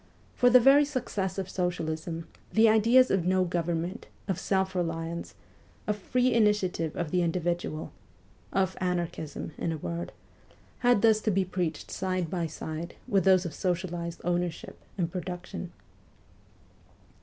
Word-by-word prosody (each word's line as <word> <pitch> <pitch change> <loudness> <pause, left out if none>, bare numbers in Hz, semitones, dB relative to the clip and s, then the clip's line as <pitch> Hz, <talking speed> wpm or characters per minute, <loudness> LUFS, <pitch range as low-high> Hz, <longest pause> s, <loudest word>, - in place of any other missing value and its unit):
For 245 - +4
the 250 +1 +8
very 275 +4 +7
success 235 -10 -2
of 190 -2 -2
socialism, 165 -3 -3 0.3
the 225 +1 +5
ideas 230 +4 +5
of 190 -3 +2
no 185 0 +3
government, 175 +3 -2 0.2
of 190 -4 -1
self 190 -1 0
reliance, 165 -1 -3 0.5
of 210 - 0
free 250 +5 +1
initiative 210 -7 +2
of 170 -3 -3
the 180 - +2
individual 170 -2 -1 0.6
of 190 -1 +1
anarchism, 170 -4 -2
in 170 - -1
a 160 - -2
word 170 +3 -4 0.7
had 245 -4 +3
thus 220 -1 +5
to 220 - 0
be 195 -1 +2
preached 175 -4 -3
side 185 -3 -2
by 175 -3 -1
side 160 +2 -6
with 195 -3 +2
those 185 -1 +5
of 170 - -4
socialized 170 -2 -2
ownership 175 -1 -2 0.2
and 170 -3 -1
production. 180 0 -5
180 Hz, 140 wpm, -28 LUFS, 170-195 Hz, 0.7 s, the